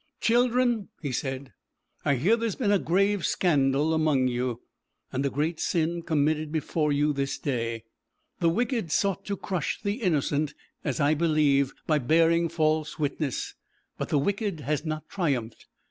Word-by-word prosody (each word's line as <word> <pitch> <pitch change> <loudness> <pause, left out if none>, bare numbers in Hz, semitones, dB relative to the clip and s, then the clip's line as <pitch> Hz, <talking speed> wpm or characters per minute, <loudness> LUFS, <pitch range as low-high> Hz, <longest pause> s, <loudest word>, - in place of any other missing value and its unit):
'Children,' 240 -2 +2 0.2
he 140 - -2
said, 135 +1 -4 0.5
'I 140 - +3
hear 175 - +3
there 230 0 -1
has 215 - -3
been 210 -6 +1
a 200 - +4
grave 195 +2 +1
scandal 145 -2 +2
among 155 -5 +2
you, 125 -1 -2 0.5
and 130 +2 -1
a 140 - +1
great 155 +4 -1
sin 170 0 0
committed 155 -1 0
before 155 -1 0
you 145 +1 +2
this 140 -1 -2
day. 115 -4 -2 0.6
The 170 - +3
wicked 230 - -1
sought 195 +2 0
to 200 -1 -3
crush 180 -6 -2
the 205 +4 -3
innocent, 150 - 0 0.3
as 140 -5 -2
I 145 +1 +4
believe, 150 -4 +2
by 155 -2 +2
bearing 165 +5 +3
false 155 -1 0
witness, 145 -2 -2 0.5
but - - -3
the 150 - +2
wicked 200 +2 -1
has 145 +2 -1
not 155 -1 -4
triumphed. 130 - -2
155 Hz, 160 wpm, -27 LUFS, 140-180 Hz, 0.6 s, a